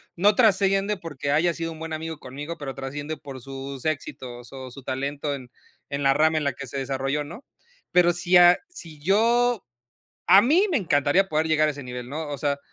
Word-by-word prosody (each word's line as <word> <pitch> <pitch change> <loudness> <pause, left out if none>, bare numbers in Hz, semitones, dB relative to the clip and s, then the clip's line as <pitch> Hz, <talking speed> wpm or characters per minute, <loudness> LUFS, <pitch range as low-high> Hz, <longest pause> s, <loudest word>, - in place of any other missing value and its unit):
no 200 +4 +4
trasciende, 200 -2 +3
porque 145 -5 -4
haya 165 +3 +3
sido 165 0 -4
un 160 - -10
buen 160 0 -5
amigo 160 0 -5
conmigo, 145 +6 -7
pero 135 -2 -5
trasciende 145 +3 -5
por 135 -3 -9
sus 135 +1 -7
éxitos 125 -5 -4
o 130 -2 -8
su 135 - -11
talento, 140 +3 -3
en 125 -2 -11 0.4
en 140 0 -3
la 135 0 +5
rama, 155 +1 +3
en 155 - 0
la 140 - +1
que 140 - -8
se 135 - -6
desarrolló, 135 +2 -2
¿no? 170 - -10 0.5
Pero 175 -1 +5
si 180 +1 +3
a 175 0 +8
si 165 - -10
yo 230 +5 +2 0.7
a 195 - +8
mí 330 - +4
me 310 - +2
encantaría, 175 - +2
poder 155 +1 +1
llegar 155 -1 +3
a - - +2
ese 145 -1 -9
nivel, 125 -1 -7
¿no? 155 +3 -5
O 145 -2 -4
sea, 140 0 0
155 Hz, 205 wpm, -25 LUFS, 135-175 Hz, 0.7 s, a